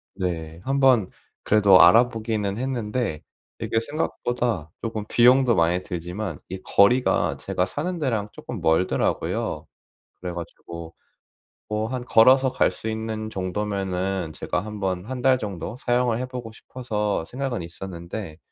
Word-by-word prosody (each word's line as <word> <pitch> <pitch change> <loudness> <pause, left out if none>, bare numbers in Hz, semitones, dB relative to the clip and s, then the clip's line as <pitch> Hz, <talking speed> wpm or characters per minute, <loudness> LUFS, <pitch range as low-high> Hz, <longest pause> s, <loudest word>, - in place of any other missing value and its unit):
네 85 -3 -3
1 135 +1 0
번 125 -8 +5 0.3
그래도 100 -3 +6
알아보기는 110 0 +4
했는데 120 - -2 0.4
이게 115 - 0
생각보다 120 - -2
쪼금 110 -2 -4
비용도 125 +1 +5
많이 85 +2 +2
들지만 90 -1 -5
이 95 0 -6
거리가 120 +8 +3
제가 90 - -1
사는데랑 145 - -2
쪼끔 - - -7
멀더라고요. 80 +3 0 0.6
그래 90 -1 -4
가지고 85 -1 -8 0.7
뭐 105 +1 -1
한 125 0 -4
걸어서 130 +3 +6
갈 - - +3
수 100 +4 -8
있는 110 0 -4
정도면은 95 -2 -2
제가 90 +3 -2
1 105 -1 -7
번 95 -2 -2
1 130 -1 -4
달 130 -1 +4
정도 105 -2 -5
사용을 120 -2 +1
해 130 - -3
보고 125 -3 -7
싶어서 105 -6 -3
생각은 125 -2 -3
있었는데 85 0 -7
105 Hz, 280 characters per minute, -24 LUFS, 90-125 Hz, 0.7 s, 그래도